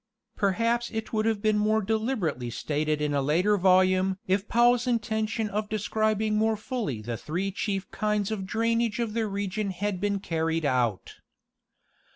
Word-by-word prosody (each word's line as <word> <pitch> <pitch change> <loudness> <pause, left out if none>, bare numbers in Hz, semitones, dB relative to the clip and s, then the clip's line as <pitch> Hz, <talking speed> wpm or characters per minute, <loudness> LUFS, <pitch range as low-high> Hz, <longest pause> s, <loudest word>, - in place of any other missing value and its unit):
Perhaps 230 +4 +1
it 220 0 -5
would 215 0 +1
have 220 -2 0
been 215 -1 +3
more 215 +1 +2
deliberately 215 - -1
stated 150 +4 -1
in 150 -1 0
a 140 - +1
later 175 +9 +2
volume 185 0 +3
if 190 +2 0
Powell's 240 +1 +3
intention 220 -1 0
of 210 +1 -3
describing 215 0 0
more 220 0 +2
fully 215 - -4
the 115 +1 -4
three 180 - -3
chief 195 0 -2
kinds 210 -1 -1
of 195 -3 -3
drainage 230 +1 0
of 230 -3 -2
the 225 -1 0
re 200 0 -2
gion 205 +1 -2
had 190 0 -3
been 200 -1 0
carried 165 -3 -1
out. 120 -7 0
205 Hz, 165 wpm, -27 LUFS, 185-220 Hz, -, been